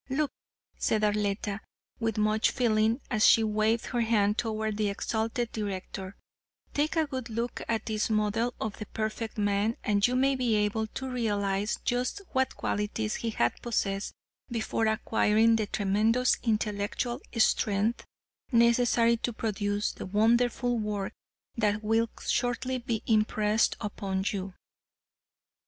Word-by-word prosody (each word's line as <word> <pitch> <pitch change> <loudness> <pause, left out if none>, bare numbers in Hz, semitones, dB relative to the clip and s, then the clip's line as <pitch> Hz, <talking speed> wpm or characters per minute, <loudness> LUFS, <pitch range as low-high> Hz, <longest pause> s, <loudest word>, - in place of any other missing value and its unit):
Look," 285 +2 0 0.5
said 215 -1 +1
Arletta, 205 0 0 0.4
with 225 -2 -1
much 215 +1 +2
feeling 225 0 +2
as 215 -3 +2
she 225 - +7
waved 215 +1 +1
her 240 -2 -1
hand 210 -3 +2
toward 220 -2 -2
the 210 -1 +1
exalted 225 +3 -2
director, 195 -2 -5 0.6
"take 300 +3 0
a 320 -1 +3
good 260 -4 -5
look 230 +2 -3
at 225 -2 -1
this 215 0 -1
model 220 +3 0
of 220 0 -4
a 215 - -5
perfect 220 +1 -4
man 205 +2 +1
and 205 0 +3
you 250 - -1
may 270 +1 +3
be 245 -4 +1
able 210 +1 0
to 265 +4 -6
realize 205 -5 -1
just 250 +11 -1
what 260 -1 +1
qualities 215 +1 -2
he 230 - -2
had 120 - +1
to - - -19
possess 200 -4 -1 0.4
before 225 -1 -1
acquiring 220 +1 +3
the 215 -2 0
tremendous 215 +6 +2
intellectual 220 +3 -1 0.2
strength 215 0 +2 0.5
necessary 235 0 +4
to 240 - -2
produce 205 -2 -1
the - - -8
wonderful 235 +4 +2
work 210 -2 -3 0.4
that 215 -2 0
will 225 +2 +2 0.2
shortly 255 +1 0
be 235 -2 -3
impressed 215 0 +2
upon 195 -3 -3
you. 190 -2 -5
220 Hz, 140 wpm, -29 LUFS, 210-235 Hz, 0.6 s, she